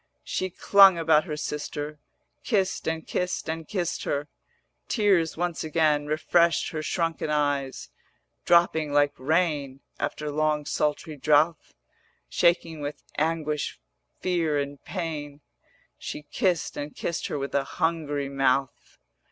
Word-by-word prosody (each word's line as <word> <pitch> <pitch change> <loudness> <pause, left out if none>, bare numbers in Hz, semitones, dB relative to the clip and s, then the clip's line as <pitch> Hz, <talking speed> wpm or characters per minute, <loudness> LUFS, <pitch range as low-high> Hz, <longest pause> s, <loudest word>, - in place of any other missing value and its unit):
She 185 - -2
clung 195 0 +6
about 160 -2 +3
her 150 - -4
sister, 150 0 -4 0.4
Kissed 195 -5 0
and 160 0 -2
kissed 180 0 -2
and 160 0 -4
kissed 180 -4 -2
her: 145 +1 -2 0.6
Tears 195 -9 +2
once 175 -1 -2
again 155 -2 +2
Refreshed 170 +2 +2
her 155 - -3
shrunken 165 0 -1
eyes, 145 -3 -1 0.5
Dropping 160 -3 +3
like 145 0 +4
rain 145 -2 0 0.2
After 150 -1 -3
long 150 0 0
sultry 150 +1 -1
drouth; 150 +3 +2 0.6
490 - - -11
Shaking 170 -2 +2
with 145 +1 -5 0.2
aguish 155 - -1 0.4
fear, 170 -5 +1
and 140 0 -4
pain, 150 -5 -5 0.6
She 150 - -6
kissed 175 +3 0
and 145 0 -5
kissed 170 - -3
her - - -3
with 140 0 -4
a 140 - +2
hungry 150 -4 0
mouth. 135 -1 0
155 Hz, 125 wpm, -26 LUFS, 145-170 Hz, 0.6 s, clung